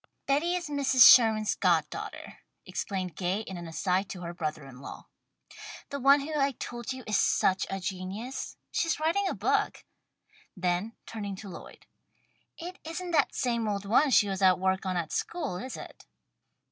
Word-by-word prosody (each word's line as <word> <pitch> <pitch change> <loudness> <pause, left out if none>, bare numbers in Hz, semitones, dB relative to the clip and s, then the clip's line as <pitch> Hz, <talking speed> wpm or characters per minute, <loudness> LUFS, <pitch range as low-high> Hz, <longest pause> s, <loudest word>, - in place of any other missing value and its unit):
"Betty 315 +6 +1
is 350 -2 -3
Mrs. 275 -4 +6
Sherman's 220 -3 +6
god - - +2
daughter," - - -8 0.3
explained 185 -3 -4
Gay 185 +3 -1
in 190 -4 -7
an 175 -1 -7
aside 185 +3 -1
to 180 - -7
her 170 0 -5
brother 155 -4 -4
in 135 -1 -12
law. - - -9 0.9
"The 280 - -3
one 275 +2 +6
who 305 +3 -5
I 275 -1 +2
told 240 0 -6
you 260 -1 -6
is 210 -1 +1
such 190 0 +2
a 195 - -3
genius. 195 +7 -5
She's 330 -2 0
writing 335 +6 +1
a - - -2
book." - - 0 0.7
Then 180 +4 -1
turning 205 -3 -5
to 200 +1 -9
Lloyd. - - -11 0.7
"It 360 +2 -8
isn't 345 +2 -5
that 300 -5 +2
same 235 -4 0
old 200 -1 -2
one 250 +8 +4
she 215 -5 +5
was 195 0 -3
at 185 -1 +5
work 190 +1 0
on 185 -1 -1
at 165 -3 -3
school, 320 - -3
is 255 +6 -6
it?" - - -11
215 Hz, 175 wpm, -29 LUFS, 185-275 Hz, 0.9 s, Mrs